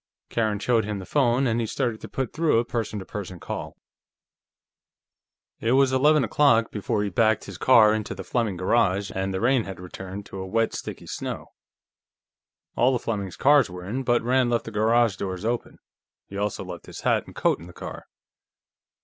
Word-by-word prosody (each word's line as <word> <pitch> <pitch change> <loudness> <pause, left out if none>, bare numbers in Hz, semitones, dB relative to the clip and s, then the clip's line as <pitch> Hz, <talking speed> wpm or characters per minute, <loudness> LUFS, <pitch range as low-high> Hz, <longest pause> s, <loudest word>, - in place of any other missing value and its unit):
Karen 110 -3 0
showed 115 +2 +2
him 105 0 -3
the 95 - -7
phone 130 0 +2
and 115 -1 +1
he 115 - -1
started 120 -2 -2
to - - -8
put 130 -3 -3
through 160 -6 +2
a 115 - +2
person 115 -3 -3
to 95 - -6
person 95 -4 -7
call. - - -6 1.8
It 115 +2 +1
was 135 0 +4
eleven 150 +2 +4
o'clock 115 -1 +3
before 105 0 -1
he 100 - -2
backed 110 +2 +2
his 95 -3 -9
car 110 -5 +6
into 110 -1 -3
the - - -7
Fleming 115 -7 -1
garage, 95 0 +1
and 95 0 -2
the 95 - -2
rain 125 +1 +2
had 95 -2 -7 0.2
turned 95 +1 -7
to 95 - -8
a 95 - -5
wet, 115 +3 +1
sticky - - -6
snow. - - -5 1.2
All 125 +3 +4
the 130 - +1
Fleming 105 -5 -3
cars 140 -5 +5
were 90 0 -8
in, 120 +8 -3
but 120 -3 +1
Rand 125 +1 +2
left 120 -1 0
the 115 - -6
garage 110 0 +2
doors 95 +1 -4
open. 120 +1 -2 0.5
He 100 - -11
also 100 -1 -2
left 90 -2 -9
his - - -9
hat - - +1
and - - -13
coat - - +1
in 85 - -11
the - - -11
car. - - -9
110 Hz, 195 wpm, -25 LUFS, 100-120 Hz, 1.8 s, car